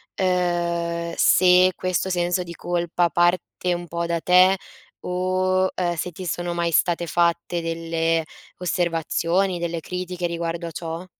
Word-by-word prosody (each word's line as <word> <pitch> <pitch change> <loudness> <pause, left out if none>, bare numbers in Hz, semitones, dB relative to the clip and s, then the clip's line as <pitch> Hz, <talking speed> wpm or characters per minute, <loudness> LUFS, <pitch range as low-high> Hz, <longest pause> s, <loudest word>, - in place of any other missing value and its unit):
ehm, 170 -2 0
se 180 0 +5
questo 185 +1 -1
senso 175 0 0
di 170 -1 -9
colpa 175 0 0
parte 175 +2 +1
un 175 0 -5
po' 170 0 -3
da 170 0 -1
te 185 +1 +5 0.4
o, 185 +1 +1
ehm, 175 -1 -1
se 180 +2 -3
ti 185 +3 -8
sono 175 +1 -2
mai 170 -1 0
state 170 +2 +2
fatte 170 +1 0
delle 165 0 -1 0.4
osservazioni, 175 +1 0
delle 170 -1 -3
critiche 180 0 -4
riguardo 170 0 -3
a - - -7
ciò? 165 +2 -6
175 Hz, 140 wpm, -23 LUFS, 170-180 Hz, 0.4 s, se